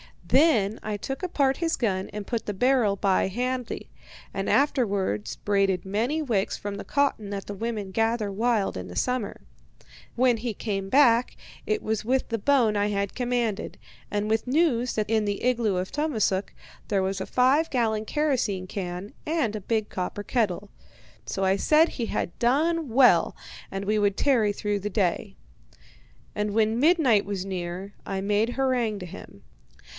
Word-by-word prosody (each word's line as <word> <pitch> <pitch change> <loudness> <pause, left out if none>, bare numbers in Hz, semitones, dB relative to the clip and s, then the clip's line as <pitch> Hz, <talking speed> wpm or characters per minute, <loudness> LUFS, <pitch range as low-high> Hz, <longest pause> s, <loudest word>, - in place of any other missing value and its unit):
Then 235 - +3
I 215 -1 -3
took 270 - -5
apart 280 -7 +1
his 330 -1 0
gun 190 -5 -1
and 210 -1 -6
put 230 0 -3
the 205 - -1
barrel 245 -1 +2
by 195 -1 +2
handy, 250 +4 -3 0.4
and - - -2
afterwards 200 - +1
braided 195 -3 0
many 230 +11 0
wicks 215 -8 0
from 205 0 -5
the 200 - -7
cotton 280 -8 0
that 200 -1 -4
the 205 - -4
women 210 -2 -4
gather 225 0 0
wild 220 - 0
in 90 0 -6
the 90 - -9
summer. 245 - -2 0.7
When 245 -1 +3
he 230 0 -3
came 195 -2 -3
back, 245 -1 +4 0.3
it 430 0 0
was 220 -1 -2
with 260 +2 0
the 230 -1 -1
bone 235 -3 +3
I 205 0 +2
had 200 -1 -1
commanded, 240 -4 -2 0.3
and 205 0 -1
with 220 +2 0
news 255 -4 +2
that 215 -1 -1
in 220 -1 +2
the 205 -1 -2
igloo 235 -5 +1
of 180 +1 -2
Tummasook 225 -10 0 0.3
there 195 -2 +1
was 190 +1 -2
a 190 - -3
five 270 +6 +3
gallon 220 -4 0
kerosene 235 -11 0
can 180 +1 -5
and 305 -9 0
a 215 - -4
big 215 +1 -1
copper 185 +2 -4
kettle. 205 -4 -1 0.6
So 195 - -2
I 190 +1 +3
said 310 +9 +4
he 235 - -3
had 170 - -3
done 305 +5 +1
well 250 +2 +5 0.3
and 195 0 -4
we 215 +1 +1
would 200 -1 +2
tarry 230 -7 +3
through 205 0 -2
the 205 +2 -3
day. 185 -3 -1 1.0
And 210 0 -2
when 220 +1 +2
midnight 285 - +4
was 195 -2 -3
near 185 +1 -5
I 195 -1 -3
made 210 +4 +1
harangue 245 -5 0
to 180 - -6
him. 100 - -11
215 Hz, 170 wpm, -26 LUFS, 200-250 Hz, 1.0 s, well